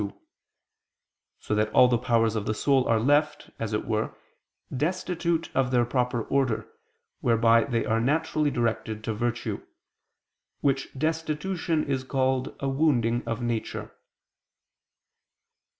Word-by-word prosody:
2); 100 -1 -4 1.2
so - - -4
that 105 0 +2
all 125 - +7
the 125 - +2
powers 115 -2 +2
of 105 -2 -2
the 110 - 0
soul 135 +1 +2
are 115 -1 +3
left, 145 +5 +1
as 115 -1 -3
it 105 - -1
were, 110 -1 -1 0.6
destitute 170 +2 -1
of 130 -1 +2
their 120 -1 +3
proper 125 -1 0
order, 120 -6 0 0.5
whereby 115 -1 +4
they 120 -4 -1
are 110 +1 +1
naturally 150 +3 +1
directed 115 -3 -2
to 110 - -2
virtue; 120 +2 -2 1.0
which 135 -1 0
destitution 160 +2 -1
is 135 -2 -1
called 130 -1 0
a 140 - -2
wounding 130 -5 +2
of 115 +1 -2
nature. 120 -2 -3
125 Hz, 130 wpm, -26 LUFS, 115-145 Hz, 1.2 s, all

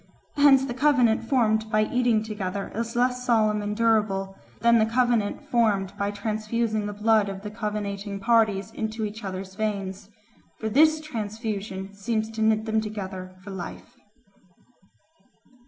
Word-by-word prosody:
Hence 280 -2 +6
the 255 - -4
covenant 255 -4 +2
formed 220 -4 +2
by 215 -1 +3
eating 240 -2 +1
together 200 -3 -4
is 230 +1 -3
less 250 +1 +1
solemn 215 -3 +2
and 205 0 -3
durable 210 -4 +1 0.3
than 235 0 +5
the 220 - +4
covenant 235 -3 +1
formed 205 -5 +1
by 200 0 -1
transfusing 215 +1 -2
the 205 - -4
blood 210 0 +2
of 195 0 -7
the 210 - -6
covenanting 205 -2 -4
parties 215 -2 +2
into 220 0 -3
each 210 +1 -7
other's 190 0 -5
veins, 200 -2 -3 0.5
for 220 - -3
this 310 +6 +4
transfusion 210 -6 -5
seems 220 +2 -2
to 225 0 -5
knit 220 0 +2
them 220 0 +1
together 190 -3 -6
for 200 - -8
life. 190 -2 -8
215 Hz, 145 wpm, -25 LUFS, 200-230 Hz, 0.5 s, Hence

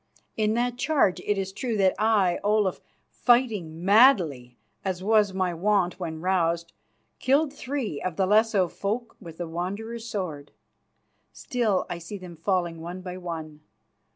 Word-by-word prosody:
In 215 0 +1
that 245 +1 -1
charge 275 - +2
it 205 - -1
is 195 0 -2
true 225 +1 -2
that 190 -2 +4
I, 210 -5 +3
Olaf, 210 -2 +1 0.3
fighting 210 -10 +1
madly, 180 - +4 0.3
as 185 -1 -3
was 210 -1 +3
my 185 -2 -1
wont 185 0 +1
when 160 -3 -5
roused, 170 -2 0 0.5
killed 280 +2 +2
three 255 - -4
of 185 -3 -3
the 190 - +2
Lesso 210 -2 +3
folk 220 +7 -4
with 165 -5 -11
the 175 - -4
Wanderer's 215 +8 -5
sword. 165 -9 -5 0.8
Still 225 -6 -1
I 170 - -5
see 170 +5 -7
them 180 -3 -10
falling 170 -1 -1
one 175 +3 -6
by 180 0 -6
one. 160 -4 -6
190 Hz, 150 wpm, -26 LUFS, 170-220 Hz, 0.8 s, that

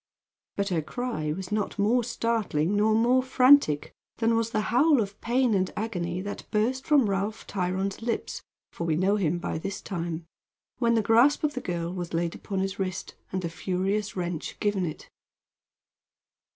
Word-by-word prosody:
But 200 0 -1
her 170 -4 +1
cry 155 -3 -3
was 185 +4 -5
not 210 -1 -1
more 225 +5 +3
startling 220 -7 0
nor 215 +1 +3
more 245 +3 +4
frantic 255 - +4 0.2
than 230 0 +2
was 230 0 +1
the 215 -2 0
howl 285 +3 +5
of 200 -2 -3
pain 245 0 +2
and 190 -2 +1
agony 180 -5 -2
that 205 +1 -6
burst 245 +5 0
from 285 -7 +5
Ralph 200 +2 -2
Tryon's 190 +1 -2
lips 230 0 -3 0.3
for 170 - -4
we 160 -2 +1
know 190 +5 +2
him 175 -4 +1
by 170 - -3
this 195 +4 -4
time 170 -3 -4 0.5
when 235 -2 +3
the 220 - +2
grasp 240 +9 +4
of 300 -1 +1
the 255 - -4
girl 170 -1 -3
was 175 -2 -4
laid 170 0 0
upon 195 -2 -4
his 195 +1 -3
wrist, 190 -1 -3 0.2
and 185 -1 -2
the - - 0
furious 190 +4 -2
wrench 175 -3 -4
given 200 -4 0
it. 155 - -7
200 Hz, 175 wpm, -27 LUFS, 180-230 Hz, 0.5 s, howl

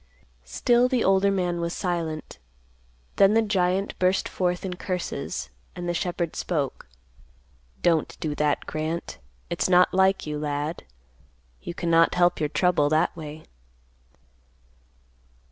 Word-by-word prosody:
Still 245 +1 +3
the 250 -2 +1
older 195 +1 +4
man 180 -3 -1
was 170 0 -2
silent. 165 -4 -3 0.8
Then 200 +2 +5
the 225 - +4
giant 195 -1 0
burst 185 +1 +2
forth 180 0 -1
in 185 - -3
curses, 165 - -4 0.2
and 175 -1 -5
the 175 - 0
shepherd 175 -1 -2
spoke, 145 -6 -3 1.0
"Don't 165 -3 +1
do 155 -2 -2
that, 150 -1 0
Grant. 155 - -4 0.3
It's - - 0
not 180 0 +5
like 190 +1 +3
you, 150 -1 -3
lad. 150 +2 -3 0.8
You 170 - -6
cannot 165 -1 +3
help 175 0 +3
your 150 - 0
trouble 175 -5 +2
that 155 +1 +2
way." 155 -1 -8
175 Hz, 130 wpm, -25 LUFS, 155-185 Hz, 1.0 s, Then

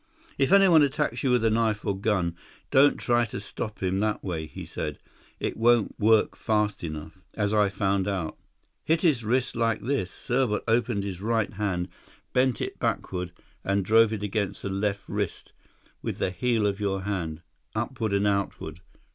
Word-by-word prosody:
"If 135 - +2
anyone 195 -5 +7
attacks 145 +1 0
you 135 - +1
with 125 -2 +3
a 110 - +4
knife 110 -1 +1
or 100 -2 0
gun, 95 -4 0 0.4
don't 140 +2 +5
try 120 -1 +2
to 105 - -6
stop 105 0 -6
him 95 +1 +1
that 105 0 0
way," 80 -5 -3
he - - -8
said. - - -4 0.4
"It - - -2
won't 120 -1 +3
work 110 0 +4
fast 105 -3 0
enough, 80 +2 -6 0.2
as 105 -1 0
I 105 -2 +4
found 95 -1 0
out. 95 -6 -2 0.5
Hit 160 +1 +1
his 145 -9 +3
wrist 125 +3 0
like 115 -2 +1
this"—Serbot 125 -1 -1
opened 115 -2 +1
his 95 -2 -5
right 110 0 0
hand, 95 -3 -1 0.5
bent 130 -2 +2
it - - -4
backward, 90 -1 -2 0.3
and 100 -1 0
drove 110 +2 +5
it 105 -2 -3
against 105 -1 -2
his 100 - -2
left 100 0 -2
wrist—"with - - -6
the 95 - 0
heel 115 +2 +1
of 100 0 0
your 95 -2 -1
hand, 85 -5 -3 0.3
upward 115 -1 -2
and 100 +1 +2
outward. 100 -5 -1
105 Hz, 170 wpm, -27 LUFS, 95-115 Hz, 0.5 s, anyone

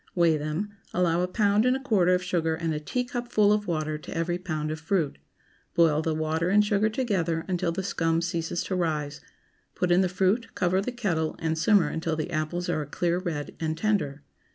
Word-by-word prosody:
Weigh 170 -3 +4
them; 155 +7 -3 0.2
allow 175 -1 +2
a 180 - +1
pound 205 +2 +2
and 255 +1 +3
a - - -8
quarter 195 -9 +3
of 180 - -2
sugar 165 -3 0
and 165 0 -2
a 150 - -2
teacupful 240 +2 +1
of 210 -1 -1
water 155 -2 -1
to 155 - -7
every 175 +1 -1
pound 155 -4 -3
of 155 - -4
fruit. 165 -3 -1 0.6
Boil 160 -3 +4
the 160 0 -1
water 160 +2 0
and 210 +2 +5
sugar 210 +1 +2
together 185 -9 -1
until 180 -2 0
the 190 +3 -3
scum 165 -3 0
ceases 170 0 -2
to 190 - -3
rise; 150 -4 -2 0.5
put 180 -1 0
in 175 +2 +5
the 185 - +1
fruit, 195 +5 0
cover 185 +1 +2
the 250 - -3
kettle, 175 -10 -1
and 160 -1 -1
simmer 170 +1 +4
until 160 +1 -2
the 155 -1 -3
apples 155 +3 -2
are 155 - 0
a 145 - -6
clear 175 +3 0
red, 160 -6 -4
and 160 -1 -2
tender. 165 -9 0
175 Hz, 205 wpm, -27 LUFS, 160-195 Hz, 0.6 s, and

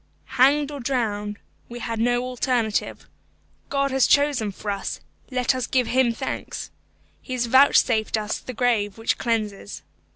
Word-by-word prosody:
Hanged 285 +2 +4
or 285 - -6
drowned 210 -5 -2 0.3
we 240 - -7
had 230 -1 -4
no 245 +1 +1
alternative. 250 -3 -1 0.6
God 275 -1 0
has 265 -1 +3
chosen 285 -7 +2
for 205 +2 -5
us; 200 -1 -4 0.3
let 255 -1 +1
us 255 -1 -3
give 255 -2 +1
Him 255 0 +2
thanks. 230 - -5 0.5
He 255 - -7
has 245 -1 0
vouchsafed 235 -3 +4
us 210 0 -3
the 255 - -8
grave 225 -4 0
which 225 - -1
cleanses. 215 -4 -3
240 Hz, 150 wpm, -23 LUFS, 220-260 Hz, 0.6 s, Hanged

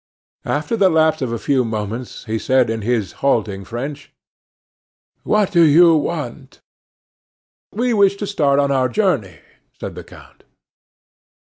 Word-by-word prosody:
After 150 +10 -2
the 195 -4 +3
lapse 160 -2 +2
of 130 -3 -2
a 115 - -2
few 130 +2 0
moments 110 +2 -5
he 110 0 -3
said 130 -2 +2
in 115 0 -3
his 110 -2 -1
halting 105 -8 0
French: 140 +7 -7 1.1
"What 210 -2 +1
do 170 - +4
you 165 +2 +6
want?" 145 -4 -4 1.1
"We 240 +3 -1
wish 200 -2 +3
to 205 - -5
start 145 -9 +1
on 140 0 +2
our 130 -2 +1
journey," 125 - -1 0.4
said - - -6
the - - -9
count. - - -17
140 Hz, 140 wpm, -19 LUFS, 115-170 Hz, 1.1 s, you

